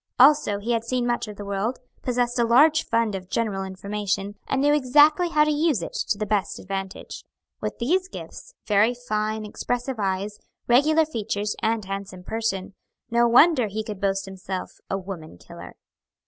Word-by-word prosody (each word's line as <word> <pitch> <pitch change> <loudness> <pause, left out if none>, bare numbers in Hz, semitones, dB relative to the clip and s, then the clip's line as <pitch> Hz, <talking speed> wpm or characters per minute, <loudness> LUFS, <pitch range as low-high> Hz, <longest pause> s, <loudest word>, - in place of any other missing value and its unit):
Also 275 -6 +6
he 215 +4 -3
had 230 -1 +1
seen 245 +1 -1
much 240 -1 -1
of 210 - -8
the 205 - -8
world, 200 +5 -2 0.2
possessed 245 -1 0
a - - +4
large 295 +7 +5
fund 230 -2 +1
of 185 -1 -6
general 205 -4 -1
information, 200 +1 -3
and 275 - 0
knew 290 +2 +4
exactly 295 +5 +4
how 300 -2 +4
to 305 - +1
use 295 - +1
it - - -6
to 205 - -1
the 215 - -2
best 205 -1 -1
advantage. 195 0 -6 0.4
With - - -3
these 365 +10 +1
gifts, - - -10
very 210 +4 +3
fine, 215 -2 -2
expressive 245 +4 -3
eyes, 200 +1 -2 0.3
regular 310 +6 +4
features, 210 -6 -3
and 220 -2 0
handsome 195 -1 -6
person, 200 -3 -3 0.4
no 235 0 +4
wonder 250 0 +5
he 215 +2 -4
could 210 -3 -7
boast 195 0 0
himself 190 -1 -6 0.2
"a 195 - 0
woman 180 - -8
killer." - - -12
220 Hz, 175 wpm, -24 LUFS, 195-250 Hz, 0.4 s, Also